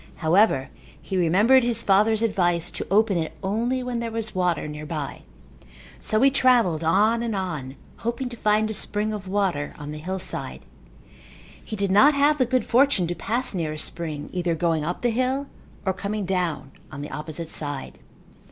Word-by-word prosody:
However, 160 -5 +2 0.3
he 190 - -6
remembered 200 +9 +4
his 235 -1 +1
father's 215 +3 +3
advice 175 -5 +1
to - - -4
open 205 0 +3
it 160 - -4
only 235 +6 -1
where 250 -1 -4
there 235 0 -3
was 225 -1 -4
water 180 -4 0
nearby. 150 -1 -5 0.8
So 215 - 0
he 275 - +6
travelled 235 - +3
on 210 +8 +3
and 230 -2 -2
on 155 -9 -4 0.2
hoping 235 +3 -3
to 240 - -8
find 215 -1 +2
a 220 - -3
spring 210 +1 -1
of 200 -2 -6
water 185 -7 -1
on 150 -1 -7
the 150 - -6
hillside. 185 +4 -4 1.0
He 220 - -6
did 200 -2 -1
not 280 +10 +6
have 290 +1 +3
the 255 - +3
good 255 -2 +1
fortune 255 -7 +3
to 170 - -2
pass 230 +9 -1
near 165 -5 -2
a - - -7
spring 155 -2 -3
either 175 -2 0
going 165 -2 0
up 175 +8 -4
the 240 - +2
hill 255 +4 0 0.4
or 190 - +1
coming 200 +2 -3
down 180 -7 -2 0.2
on 140 +1 -6
the 150 - -7
opposite 155 +2 -6
side. 145 -4 -5
195 Hz, 180 wpm, -24 LUFS, 165-230 Hz, 1.0 s, he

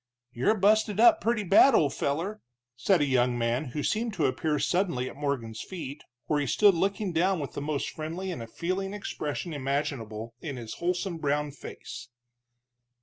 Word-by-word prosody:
"You're 130 - +2
busted 210 +1 +3
up 325 +8 +7
purty 230 -2 +1
bad, 205 +7 +6
old 145 -8 +3
feller," 175 +10 -2 0.3
said 170 +7 +2
a - - +4
young 125 -2 +2
man 120 +4 0
who 145 +3 -4
seemed 225 0 -1
to 160 -5 +1
appear 150 +4 0
suddenly 170 -6 0
at - - -8
Morgan's 130 -6 -3
feet, 155 -6 -7 0.2
where 150 - +1
he 145 - -1
stood 205 - +5
looking 195 +2 -1
down 180 +2 +2
with 140 - -4
the - - -4
most 145 -1 -2
friendly 170 +5 -4
and 115 -9 -6
feeling 195 +3 -2
expression 165 -4 -4
imaginable 130 -6 -3
in 145 -5 -5
his 115 -2 -6
wholesome 180 0 -1
brown 145 0 0
face. 125 -3 -9
155 Hz, 170 wpm, -28 LUFS, 135-195 Hz, 0.3 s, up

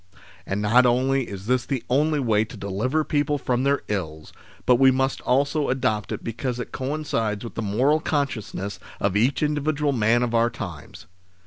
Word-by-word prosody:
And 100 +2 -2
not 125 +4 +5
only 130 +1 +1
is 100 -1 -7
this 125 +1 +1
the 130 -1 -3
only 150 +4 +2
way 110 -5 +2
to 110 - -10
deliver 115 +11 -1
people 145 -1 0
from 125 -2 -1
their 140 +1 +1
ills, 80 -7 -4 0.3
but 125 -1 +5
we 135 +1 +6
must 135 0 0
also 140 +3 +1
adopt 125 -5 0
it - - -4
because 120 +2 -3
it 125 - -5
coincides 130 -7 -2
with 115 - -7
the - - -4
moral 125 +9 +2
consciousness 120 - -3 0.2
of 100 -1 0
each 125 +8 +2
individual 150 0 0
man 120 -1 +2
of 120 -1 -2
our 115 0 +3
times. 90 -10 -8
125 Hz, 180 wpm, -24 LUFS, 105-140 Hz, 0.3 s, we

